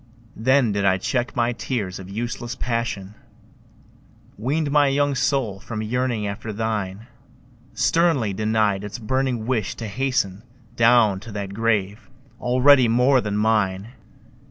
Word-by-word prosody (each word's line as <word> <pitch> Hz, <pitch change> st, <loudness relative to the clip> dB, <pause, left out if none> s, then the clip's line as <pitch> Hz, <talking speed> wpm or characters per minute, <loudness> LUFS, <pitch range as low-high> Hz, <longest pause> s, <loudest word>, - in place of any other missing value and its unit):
Then 130 Hz, 0 st, +3 dB
did 100 Hz, 0 st, -1 dB
I 95 Hz, -1 st, +3 dB
check 120 Hz, +6 st, -2 dB
my 120 Hz, 0 st, +1 dB
tears 110 Hz, -5 st, -4 dB
of 95 Hz, 0 st, -10 dB
useless 120 Hz, +3 st, -4 dB
passion, 115 Hz, -6 st, -3 dB, 1.2 s
Weaned 145 Hz, +7 st, -1 dB
my 145 Hz, -1 st, +4 dB
young 145 Hz, +1 st, +1 dB
soul 130 Hz, -7 st, 0 dB
from 110 Hz, +1 st, -5 dB
yearning 120 Hz, -1 st, -1 dB
after 110 Hz, +2 st, -5 dB
thine, 105 Hz, -1 st, -3 dB, 0.7 s
Sternly 130 Hz, -, +2 dB
denied 105 Hz, -1 st, 0 dB
its 105 Hz, +2 st, -6 dB
burning 125 Hz, 0 st, -1 dB
wish 115 Hz, -5 st, -1 dB
to 115 Hz, -, -6 dB
hasten 110 Hz, -4 st, -1 dB, 0.3 s
Down 115 Hz, -4 st, +4 dB
to 115 Hz, +3 st, -10 dB
that 100 Hz, -1 st, -5 dB
grave 105 Hz, 0 st, -1 dB, 0.3 s
already 130 Hz, +1 st, +5 dB
more 125 Hz, +3 st, +3 dB
than 105 Hz, -2 st, -2 dB
mine! 105 Hz, -2 st, +1 dB
115 Hz, 130 wpm, -22 LUFS, 105-125 Hz, 1.2 s, already